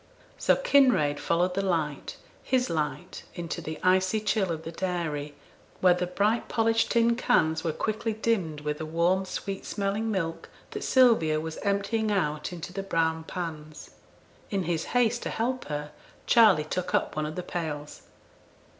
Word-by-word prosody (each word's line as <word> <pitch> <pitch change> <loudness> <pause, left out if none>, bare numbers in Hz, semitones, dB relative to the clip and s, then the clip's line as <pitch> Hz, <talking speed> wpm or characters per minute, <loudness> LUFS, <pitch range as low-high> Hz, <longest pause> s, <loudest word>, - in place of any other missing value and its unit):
So - - +4
Kinraid 255 - +3
followed 180 +2 +1
the 195 - 0
light 165 -6 -2 0.2
his 255 -1 0
light 150 -3 -3
into 170 -3 -4
the 155 0 -6
icy 185 +3 +3
chill 210 -3 0
of 160 -1 -4
the 165 - -6
dairy, 165 -5 -3 0.4
where 180 -1 +6
the 180 0 -2
bright 205 +6 0
polished 225 0 +2
tin 235 0 +3
cans 160 -10 +2
were 165 - 0
quickly 220 +6 -2
dimmed 195 -9 -1
with 150 0 -3
the 155 - -4
warm, 175 +4 +1
sweet 195 +1 -5
smelling 205 +2 -2
milk, 165 -6 -3 0.2
that 420 -2 -5
Sylvia 225 -13 +4
was 160 0 -5
emptying 205 +2 0
out 150 -6 -1
into 175 0 -7
the 195 - -3
brown 160 -4 0
pans. 155 -4 -7 0.6
In 195 -2 -1
his 165 -1 -1
haste 240 0 +2
to - - -3
help 250 +3 -2
her, 150 0 -4 0.3
Charley 210 -10 +6
took 180 +4 -2
up - - 0
one 155 0 -1
of 155 - -6
the 180 - -4
pails. 155 -4 -5
180 Hz, 165 wpm, -27 LUFS, 160-215 Hz, 0.6 s, where